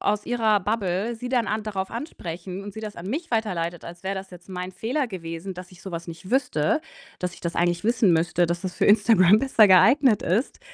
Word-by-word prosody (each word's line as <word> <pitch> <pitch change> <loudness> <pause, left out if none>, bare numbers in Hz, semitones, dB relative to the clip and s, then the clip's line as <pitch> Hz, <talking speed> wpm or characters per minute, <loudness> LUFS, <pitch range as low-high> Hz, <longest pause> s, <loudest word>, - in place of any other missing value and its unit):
aus 210 0 0
ihrer 220 -4 +2
Bubble 205 +2 -1
sie 245 +2 -6
dann 245 -4 +1
an 215 +1 -1
darauf 195 -3 -4
ansprechen 185 - -6
und 205 - -8
sie 220 - -6
das 210 -1 -7
an 170 - -8
mich 310 - -4
weiterleitet, 175 -7 -2
als 175 +1 -10
wäre 195 +1 -1
das 190 0 -7
jetzt 180 +1 -14
mein 180 0 -5
Fehler 250 +9 -1
gewesen, 175 -1 -6
dass 180 +1 -10
ich 180 - -16
so 190 - -7
was 170 +1 -5
nicht 170 +4 -9
wüsste, 250 - +1 0.4
dass 180 -1 -3
ich - - -16
das 170 -1 -4
eigentlich 175 +2 +1
wissen 225 -5 +3
müsste, 170 +1 +2
dass 170 +2 -3
das 185 -1 -4
für - - 0
Instagram 205 -2 +6
besser 230 -4 +5
geeignet 230 +5 +5
ist, 205 +10 -1
195 Hz, 225 wpm, -24 LUFS, 175-225 Hz, 0.4 s, Instagram